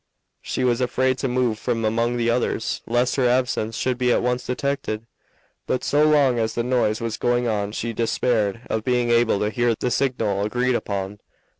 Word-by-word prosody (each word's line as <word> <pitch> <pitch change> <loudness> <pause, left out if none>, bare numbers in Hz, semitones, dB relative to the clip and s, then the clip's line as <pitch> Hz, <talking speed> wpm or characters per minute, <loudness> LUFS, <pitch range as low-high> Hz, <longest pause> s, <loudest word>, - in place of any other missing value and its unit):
She 130 - -3
was 125 0 +1
afraid 130 +1 +1
to 135 - -1
move 125 -3 0
from 115 -1 -1
among 115 +2 0
the 115 -1 0
others 115 -2 -1
lest 120 +3 +1
her 130 -2 +3
absence 120 -3 0
should 125 +1 -1
be 125 -1 +2
at - - +2
once 125 0 0
detected, 125 -4 -2 0.6
but 130 - -1
so 145 +1 +2
long 140 -5 +3
as 110 0 -1
the 120 - 0
noise 120 -3 +1
was 115 -1 -3
going 120 0 +1
on 105 -2 -1
she 115 +1 -3
despaired 115 -2 0
of 110 - -2
being 125 -1 +1
able 115 -3 +3
to 105 0 0
hear 120 0 +1
the 125 - -2
signal 115 -7 0
agreed 125 +4 0
upon. 100 -3 -3
120 Hz, 190 wpm, -23 LUFS, 110-125 Hz, 0.6 s, her